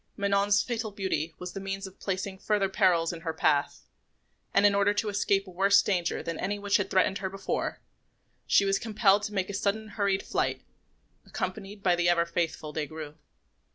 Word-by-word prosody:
Manon's 200 +1 +2
fatal 225 -3 -3
beauty 185 -6 -3
was 180 -1 -7
the - - -5
means 195 0 -4
of 190 0 -12
placing 190 0 -3
further 205 -1 +1
perils 180 -4 +2
in 165 - -8
her 160 -1 -4
path, 145 -2 +1 0.7
and, 200 - +4
in 205 - +6
order 200 +1 +2
to 210 +1 0
escape 200 -1 +1
a 185 - -11
worse 195 +2 +4
danger 175 -4 -1
than 165 -1 -4
any 205 +2 -1
which 200 0 +2
had 205 - -2
threatened 190 +1 +2
her 190 -1 -3
before, 195 0 -3 0.7
she 200 - +4
was 195 0 +2
compelled 210 -2 +3
to 210 0 -5
make 190 0 -1
a - - -8
sudden 210 +2 -1
hurried 200 -2 0
flight, - - -1 0.6
accompanied 200 -1 -5
by 180 -2 +4
the 175 0 +2
ever 170 -1 +3
faithful 165 -3 -3
Des 150 -1 -2
Grieux. 155 -1 -8
195 Hz, 190 wpm, -28 LUFS, 175-200 Hz, 0.7 s, in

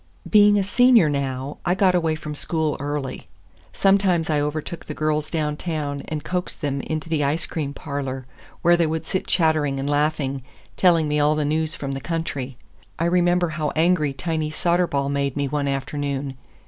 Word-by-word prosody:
Being 205 -1 +6
a 200 - +2
Senior 235 - +5
now, 135 0 -3
I 180 - +1
got 190 -1 +3
away 165 -3 +1
from 155 -1 -6
school 155 0 -1
early. 145 -1 -4 0.4
Sometimes 190 -5 +2
I 150 -1 +2
overtook 155 +3 -4
the 150 - -6
girls 155 0 0
downtown 150 -2 -2
and 155 -2 -4
coaxed 180 0 -3
them 140 -2 -1
into 155 +2 -4
the 160 -2 0
ice 155 +4 0
cream 150 -4 -3
parlor, 135 -2 -5 0.4
where 175 +1 +6
they 170 -2 +2
would 160 0 -3
sit 185 - -2
chattering 155 -5 +2
and 135 - -3
laughing, 145 -2 0 0.3
telling 170 -4 +4
me 150 0 +1
all 150 +1 +3
the 150 -1 0
news 155 +2 0
from 140 -4 -4
the 135 0 -4
country. 140 -6 -4 0.4
I 165 - 0
remember 175 0 +2
how 155 -1 -2
angry 160 -2 +3
Tiny 155 +3 -2
Soderball 155 -4 0
made 140 -1 -1
me 140 -1 0
one 145 0 -1
afternoon. 140 0 -3
155 Hz, 175 wpm, -23 LUFS, 140-170 Hz, 0.4 s, Being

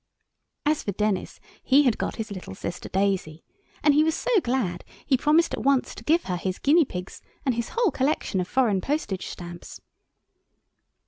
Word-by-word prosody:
As 300 0 +2
for 200 - -3
Denis, 210 0 -1 0.2
he 275 +2 +5
had 250 -5 +2
got - - -2
his 225 -2 -5
little 180 - -7
sister 170 - -6
Daisy, 190 -5 -1 0.4
and 295 - +5
he 300 +2 +5
was 320 0 +1
so - - -2
glad 235 - -1 0.2
he 275 - +3
promised 305 +6 +3
at - - -2
once 275 -1 +2
to - - -11
give 330 +3 +3
her 180 -2 -2
his 185 +1 -3
guinea 310 +3 +4
pigs 180 -5 -7 0.2
and 260 - +2
his 235 0 -3
whole 465 -7 +3
collection 260 -8 0
of 180 - -4
foreign 220 -7 +2
postage 270 -9 -2
stamps. 175 -1 -9
235 Hz, 180 wpm, -25 LUFS, 185-295 Hz, 0.4 s, he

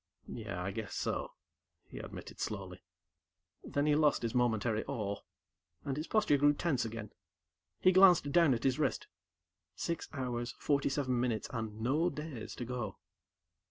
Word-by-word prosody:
"Yeah, 90 +1 -5
I 100 - -2
guess 105 +1 -5
so," - - -2 0.5
he - - -9
admitted - - -9
slowly. - - -4 0.8
Then 145 0 0
he 150 - +4
lost 150 -3 +3
his 115 - -1
momentary 115 -2 +1
awe, 100 -3 -3 0.7
and 135 -2 -1
his 155 +3 -4
posture 215 -9 +3
grew 145 +1 +5
tense 145 -7 0
again. 110 -2 -5 0.7
He 185 - +6
glanced 180 -6 +6
down 165 -5 +5
at 115 - -5
his 130 -2 +2
wrist. - - 0 0.7
Six 170 -1 -3
hours, 125 -4 -3
forty 140 -2 +1
seven 130 -3 0
minutes, 120 -3 -1
and 110 -2 -4
no 150 +9 +2
days 150 -7 -6
to 120 - -5
go. 120 -5 -4
125 Hz, 155 wpm, -33 LUFS, 115-150 Hz, 0.8 s, He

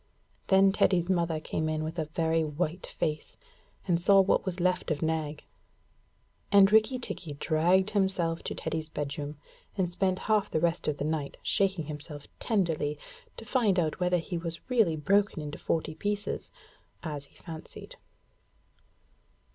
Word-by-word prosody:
Then 195 0 +6
Teddy's 185 -2 +2
mother 170 -3 +1
came 155 0 -2
in 155 0 -1
with 160 +2 -4
a 155 - 0
very 160 +1 +1
white 155 +3 -3
face, 150 -1 -3 0.5
and 170 -2 +2
saw 195 +2 +6
what 195 0 +3
was 185 0 -2
left 180 0 +1
of 155 -1 -1
Nag, 155 -2 -2 1.1
and 200 -1 +7
Rikki 220 +4 +4
tikki 185 -10 -4
dragged 175 +7 +2
himself 190 -5 0
Teddy's 160 -1 -3
bedroom 145 0 -4 0.4
and 180 -3 0
spent 185 +1 +1
half 210 -2 +2
the 155 - 0
rest 170 +1 0
of 150 -1 0
the 145 - -2
night 155 -2 -2
shaking 190 -5 +1
himself 150 -1 -8
tenderly 165 -9 0 0.4
to 225 - -8
find 225 -6 +2
out 160 -1 -1
whether 180 0 +2
he 170 0 -4 0.3
really 225 -10 +3
broken 195 +4 +2
into 150 -1 -6
forty 160 -1 -1
pieces, 205 +4 -3 0.5
as 150 -3 -5
he - - -25
fancied. 160 -1 -10
170 Hz, 145 wpm, -29 LUFS, 155-190 Hz, 1.1 s, and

